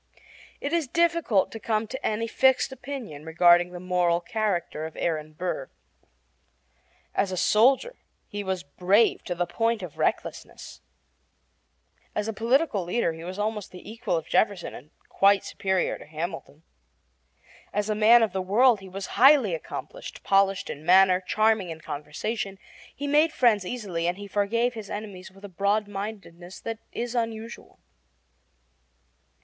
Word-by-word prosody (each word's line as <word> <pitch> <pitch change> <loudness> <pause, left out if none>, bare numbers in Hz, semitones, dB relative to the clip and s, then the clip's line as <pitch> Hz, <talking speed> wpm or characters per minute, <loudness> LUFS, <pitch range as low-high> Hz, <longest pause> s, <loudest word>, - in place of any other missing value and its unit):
It - - -3
is 335 -4 +1
difficult 335 - +2
to 225 - -7
come 215 0 -1
to 260 +5 -7
any 220 +1 0
fixed 265 +3 +2
opinion 245 - -7
regarding 175 +2 +4
the 180 0 -8
moral 180 -1 +1
character 190 -7 -2
of 160 - -13
Aaron 155 -2 -2
Burr. 180 - -4 1.4
As 195 -1 0
a 185 - -3
soldier 265 - +3 0.3
he 205 0 -5
was 190 -2 -3
brave 190 +9 +2
to 175 - -3
the 175 +1 0
point 225 +4 -1
of 170 -5 -9
recklessness. - - -3 1.3
As 210 0 -1
a 225 - -2
political 235 - +1
leader 175 -1 0
he 160 0 -10
was 185 +2 -6
almost 210 -1 -2
the 180 - -12
equal 220 -6 -2
of 160 - -5
Jefferson 200 -4 +1
and 145 - -11 0.2
quite 200 0 +3
superior 190 -2 -1
to - - -13
Hamilton. 160 -1 -6 1.1
As 205 0 -1
a 215 - +1
man 225 +3 +6
of 215 - 0
the 190 - -1
world 220 +5 +4
he 195 -1 -11
was 195 +1 -6 0.2
highly 265 - +7
accomplished, - - -7
polished 195 -1 +2
in 145 - -9
manner, 185 +1 +5
charming 215 0 +1
in 160 -1 -7
conversation. 160 +8 -4 0.4
He 285 - -5
made 300 +3 +3
friends 220 - +2
easily, 185 -9 -3
and 175 +1 -1
he 205 - -8
forgave 220 +5 0
his 220 -4 -8
enemies 205 -3 -7
with 195 +2 -13
a - - -6
broadmindedness 200 -2 -3
that 225 -1 -5
is 240 0 -4
unusual. 230 -1 -4
200 Hz, 150 wpm, -26 LUFS, 180-230 Hz, 1.4 s, highly